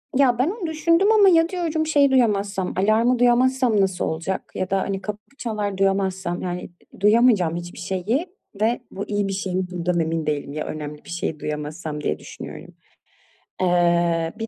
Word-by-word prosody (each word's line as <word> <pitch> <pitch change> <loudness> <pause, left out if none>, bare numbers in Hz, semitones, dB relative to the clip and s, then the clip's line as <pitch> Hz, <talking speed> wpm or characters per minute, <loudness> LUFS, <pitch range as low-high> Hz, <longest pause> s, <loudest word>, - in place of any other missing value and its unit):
Ya, 250 -3 +3
ben 280 +7 +3
onu 395 -5 -4
düşündüm 335 +6 +3
ama 415 -3 +6
ya, 330 -1 +4
diyorum 330 -4 -1
şey 285 -3 +4
duyamazsam, 200 -7 +1
alarmı 225 +5 +3
duyamazsam 245 -2 +3
nasıl 190 -2 0
olacak 170 +4 -3
ya 185 0 -2
da, 195 0 +1
hani, 195 -1 -3
kapı 210 0 -5 0.2
çalar 210 -4 -3
duyamazsam, 190 -2 0
yani, 180 0 -4 0.3
ı - - -16
duyamayacağım 210 -6 +4
hiçbir 175 0 -7
şeyi 195 - -1 0.3
ve 230 +3 +2
bu 200 - -5
iyi 205 -1 -1
bir 195 - -2
şey 190 -1 -3
mi 185 - +1
bundan 175 0 -1
emin 165 -1 -1
değilim. 145 -2 -2
Ya 155 - -3
önemli 150 -1 -6
bir - - -13
şeyi 170 -3 -3
duyamazsam 150 +1 -5
diye 75 - -1
düşünüyorum. - - -10 0.9
Eee, 170 -2 +2
bir 225 - -3
195 Hz, 175 wpm, -23 LUFS, 175-245 Hz, 0.9 s, ama